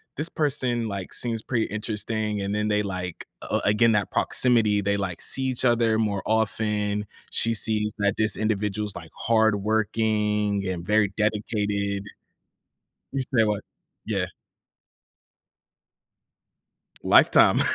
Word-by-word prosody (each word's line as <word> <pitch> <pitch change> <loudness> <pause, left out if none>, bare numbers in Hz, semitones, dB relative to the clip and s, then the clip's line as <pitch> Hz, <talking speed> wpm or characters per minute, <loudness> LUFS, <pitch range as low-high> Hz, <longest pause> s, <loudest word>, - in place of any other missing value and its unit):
this 155 +3 -3
person, 130 -6 -1
like, 100 -2 -5
seems 115 -2 -2
pretty 115 -3 0
interesting," 105 0 -3
and 100 +1 -2
then 105 0 0
they, 105 0 +2
like 90 -3 -5 0.2
a - - -1
again, 105 +3 +4
that 100 -1 +1
proximity, 115 -5 +2
they, 100 0 0
like, 95 -4 -3
see 135 - -3
each 130 -1 -1
other 115 -2 +3
more 100 -3 0
often. 105 -1 0 0.3
She 115 0 +1
sees 105 -1 0
that 100 0 +2
this 110 0 +1
individual's, 105 -1 -1
like, 80 -2 -9
hardworking, 105 -1 +1
and 85 -2 -4
very 105 -1 +2
dedicated. 105 -2 -1 1.1
You 135 - -2 0.2
say 110 - +6
what? 105 -1 0 0.5
Yeah. - - -1 2.8
Lifetime. - - +6
105 Hz, 120 wpm, -25 LUFS, 100-110 Hz, 2.8 s, say